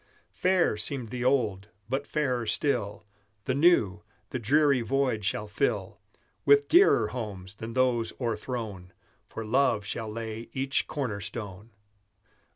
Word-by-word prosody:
Fair 180 - +2
seemed 125 -1 -2
the 125 +1 -4
old; 110 -7 +1 0.2
but 135 +4 -2
fairer 125 -6 -1
still 105 -4 0 0.4
The 130 - 0
new, 130 - +3 0.3
the 130 - -2
dreary 140 +3 +3
void 125 -2 0
shall 105 +1 -1
fill 110 +7 -1 0.4
With 425 0 +5
dearer 325 - +5
homes 100 -6 -6
than 110 +2 -7
those 125 -3 +1
o'erthrown, 110 -6 -4 0.3
For 115 - -6
love 115 -3 +2
shall 110 +2 -4
lay 115 0 -6
each 135 +1 0
corner 125 -9 -3
stone. 100 +1 -6
115 Hz, 130 wpm, -28 LUFS, 105-135 Hz, 0.4 s, With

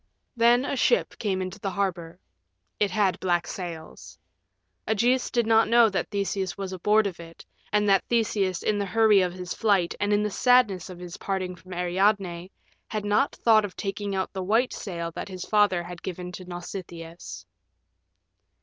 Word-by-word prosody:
Then 240 +2 +4
a 280 - -2
ship 480 - +2
came 190 -3 -1
into 185 +2 -7
the 195 - -3
harbor. 180 -4 -3 0.6
It 205 - +2
had 200 -3 +1
black 175 -2 0
sails. 165 - -8 0.7
Ægeus 240 +4 +1
did 235 -2 +1
not 225 0 +4
know 235 -1 +6
that 190 -3 -2
Theseus 195 -2 -2
was 195 -1 -5
aboard 210 +4 +2
of 190 -4 -4
it, 165 0 -12 0.3
and 210 0 +2
that 195 -1 +4
Theseus 205 -6 0
in 210 -1 +1
the 200 - -2
hurry 215 0 +4
of 180 -1 0
his 180 -1 -5
flight 200 -6 +1
and 205 0 0
in 205 0 +3
the 210 - -1
sadness 215 -7 +3
of 180 - -9
his 175 -1 -8
parting 185 -2 -3
from 185 +1 -12
Ariadne 180 0 0 0.4
had 215 -1 -4
not 210 +7 +1
thought 220 -2 +4
of 200 -3 -6
taking 200 0 -3
out 190 -1 -2
the 190 - -4
white 225 +7 +1
sail 170 -4 -5
that 165 - -7
his 185 -1 -6
father 205 -5 +2
had 175 0 -9
given 180 -1 -6
to 185 +1 -9
Nausitheus. 175 -1 -8
195 Hz, 175 wpm, -26 LUFS, 180-210 Hz, 0.7 s, know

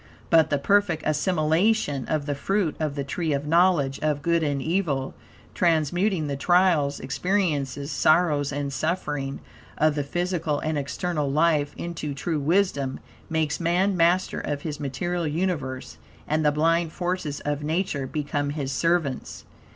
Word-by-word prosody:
But, 165 -2 +5
the 145 - +2
perfect 175 +1 +2
assimilation 155 0 +1
of 155 -2 -1
the 145 - -1
fruit 170 +3 0
of 155 -3 -2
the 140 - -2
"Tree 155 +3 -2
of 140 +1 -2
Knowledge 165 -4 +3
of 150 -2 -1
Good 170 0 +2
and 145 -3 0
Evil;" 155 -4 -1 0.4
transmuting 175 +2 +1
the 140 -1 -2
trials, 165 -2 +3
experiences, 145 -3 -1
sorrows, 155 -3 +3
and 140 -1 -3
suffering 145 -3 -2 0.4
of 155 0 +3
the 145 -1 -1
physical 165 -1 -1
and 155 0 -1
external 150 +1 -2
life 150 0 +2
into 160 -4 -4
true 155 +2 -2
wisdom; 145 -4 +1 0.3
makes 160 -2 0
man 180 +3 +2
master 175 +2 +2
of 145 -1 -4
his 150 -2 -4
material 170 +5 -2
universe; 150 -6 -3 0.3
and 155 +1 +1
the 150 - +4
blind 165 +2 +1
forces 175 -5 -2
of 145 0 -2
Nature 155 -3 -1
become 145 0 -2
his 145 -2 -3
servants. 160 -1 -1
155 Hz, 145 wpm, -25 LUFS, 145-175 Hz, 0.4 s, But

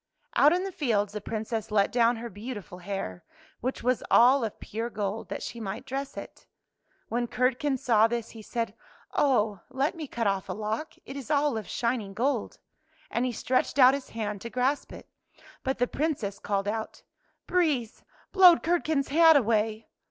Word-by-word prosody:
Out 290 - +6
in 360 +2 +1
the 390 - -4
fields 210 - 0
the 210 - -4
Princess 220 +1 -4
let 205 -2 +2
down 240 0 +3
her 230 +1 -6
beautiful 205 -3 -8
hair, 180 - -5 0.4
which 255 +1 -3
was 250 0 +1
all 255 +2 +6
of 220 - -4
pure 225 +3 -4
gold, 210 0 -4
that - - -5
she 235 - -6
might 200 +3 -5
dress 275 +1 -5
it. - - -9 0.6
When 240 +1 -1
Curdken 260 +3 +1
saw 225 -3 +4
this 235 -1 -3
he 225 - -10
said, 230 +2 -3 0.2
'' - - -30
Oh, 215 -8 +2
let 270 +4 0
me 320 -4 -6
cut 235 -3 -3
off 195 -2 0
a - - -1
lock. 220 +8 -3
It 270 - -8
is 280 0 -7
all 290 -3 +2
of 220 -2 -5
shining 230 -5 -2
gold." 265 +6 -1 0.5
And 235 - 0
he 255 - 0
stretched 255 +3 0
out 260 -1 +8
his 280 -1 -4
hand 210 -3 -4
to 235 - -6
grasp 255 +4 0
it. - - -11 0.5
But 265 0 -1
the 245 - +2
Princess 250 -9 -2
called 200 -1 -1
out, 220 +1 -4 0.2
" - - -43
Breeze, 295 -11 0 0.3
blow 370 -3 +8
Curdken's 315 -4 0
hat 325 +2 +7
away! 220 -2 0
235 Hz, 185 wpm, -28 LUFS, 215-275 Hz, 0.6 s, out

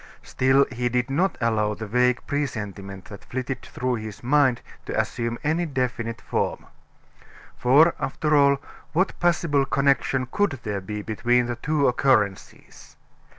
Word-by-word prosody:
Still, 135 +2 +3
he 120 0 -1
did 125 +2 -1
not 180 +8 +1
allow 105 -3 +1
the 110 - -6
vague 125 +3 +1
presentiment 100 -9 -4
that 100 - -11
flitted 130 0 -4
through 125 -1 -3
his 110 0 -8
mind 130 -1 +3 0.3
to - - -1
assume 115 -1 -2
any 160 +3 0
definite 125 -4 -3
form. - - -2 0.9
For 145 +7 +5
after 150 +3 0
all, 140 -1 +5 0.4
what 185 +4 0
possible 165 -5 +2
connection 135 -1 +1
could 200 -11 0
there 105 -3 -3
be 105 +2 -5
between 120 +3 +1
the 120 0 -3
two 150 +2 +1
occurrences? 115 -7 -1
125 Hz, 140 wpm, -24 LUFS, 115-140 Hz, 0.9 s, For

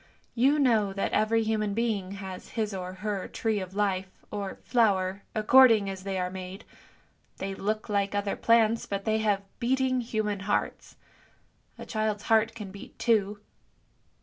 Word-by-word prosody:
You 270 +5 +3
know 225 -8 +3
that 195 - -2
every 225 +1 +2
human 215 -2 -1
being 210 -5 -1
has 190 -2 -8
his 215 -2 -1
or 185 -1 -5
her 195 0 -4
tree 220 -2 -1
of 185 0 -7
life, 195 -2 0 0.2
or 200 -2 -4
flower, 200 -5 +2
according 220 -2 +6
as 190 -1 -7
they 195 0 -3
are 180 0 -2
made; 190 +2 -8 0.7
they 195 0 -4
look 215 +3 -2
like 200 -1 0
other 200 0 -1
plants, 230 -1 +3
but 200 0 -3
they 220 0 +1
have 205 -2 +1 0.2
beating 255 +1 +1
human 215 -3 -2
hearts. 200 +1 -2 0.8
A - - -8
child's 215 -2 -2
heart 225 0 +2
can 210 -4 -7
beat 200 - -12
too. 210 -3 +1
210 Hz, 155 wpm, -28 LUFS, 195-225 Hz, 0.8 s, according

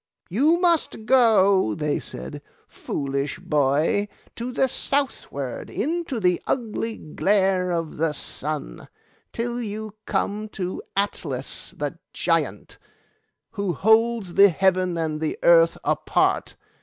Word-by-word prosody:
'You 300 - +3
must 335 -10 +1
go,' 200 - +4
they 150 -1 -1
said, 65 +2 -7 0.3
'foolish 140 0 -3
boy, 150 +8 +1 0.3
to 240 +2 -4
the 265 - +2
southward, 255 - -2
into 315 -2 -2
the 180 -3 +2
ugly 225 -2 -2
glare 190 +3 +1
of 165 -3 -2
the 160 +1 +1
sun, - - -6 0.4
till 240 +1 -3
you 215 -1 -5
come 210 +2 -1
to 185 -2 -4 0.2
Atlas 200 +1 -2
the - - -4
Giant, - - -1 0.7
who 200 -3 -2
holds 220 +1 +2
the 200 +2 +7
heaven 185 -1 +1
and 155 -2 -2
the 155 - -2
earth 165 -1 +6
apart. - - +1
195 Hz, 115 wpm, -24 LUFS, 165-230 Hz, 0.7 s, the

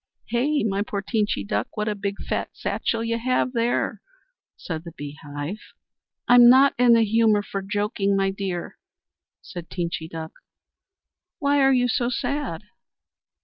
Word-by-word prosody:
"Hey, 280 +6 +1
my 200 -2 0
poor 205 -1 -3
Teenchy 205 - -1
Duck! 105 - -3
What 210 0 -1
a 210 - +1
big 200 0 -4
fat - - -2
satchel 230 -1 -2
you 230 0 -1
have 255 +1 0
there," 235 0 0 0.6
said 160 -2 -5
the 170 -2 -10
Bee 145 -2 -8
Hive. 145 +7 -6 0.7
"I'm 245 0 +8
not 270 +3 +6
in 245 -1 +6
the 230 -1 +5
humour 220 -1 +3
for 195 -1 -4
joking, 205 0 0
my 195 0 +1
dear," 190 -3 -5 0.6
said 175 -2 -9
Teenchy 170 -2 -4
Duck. 160 -1 -6 1.1
"Why 285 0 +2
are 270 0 +5
you 250 -1 +3
so 240 0 0
sad?" 255 - -3
210 Hz, 150 wpm, -24 LUFS, 180-240 Hz, 1.1 s, I'm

